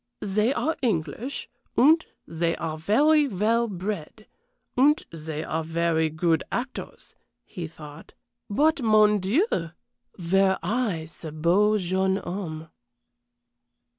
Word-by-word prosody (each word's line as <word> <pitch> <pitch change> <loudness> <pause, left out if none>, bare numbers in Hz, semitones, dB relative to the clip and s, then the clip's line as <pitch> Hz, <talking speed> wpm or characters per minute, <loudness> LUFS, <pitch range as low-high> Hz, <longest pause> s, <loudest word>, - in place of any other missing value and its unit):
"They 210 +4 +1
are 320 +3 0
English, 220 - -2 0.3
and 315 +6 +6 0.2
they 165 0 -1
are 160 -1 -4
very 290 - +3
well 230 +2 +1
bred, 200 0 -5 0.5
and 290 +4 +3
they 155 -1 -5
are 160 0 -2
very 165 0 +1
good 160 +1 +1
actors," 255 +2 -6 0.3
he 170 -3 -6
thought. 155 -1 -13 0.3
"But, 300 +8 +2
mon 215 -2 +4
Dieu! 220 - +2
were 180 +3 -1
I 200 -5 -1
ce 160 0 -9
beau 180 +8 +3
jeune 190 0 0
homme!" 175 -5 -6
190 Hz, 110 wpm, -25 LUFS, 165-230 Hz, 0.5 s, and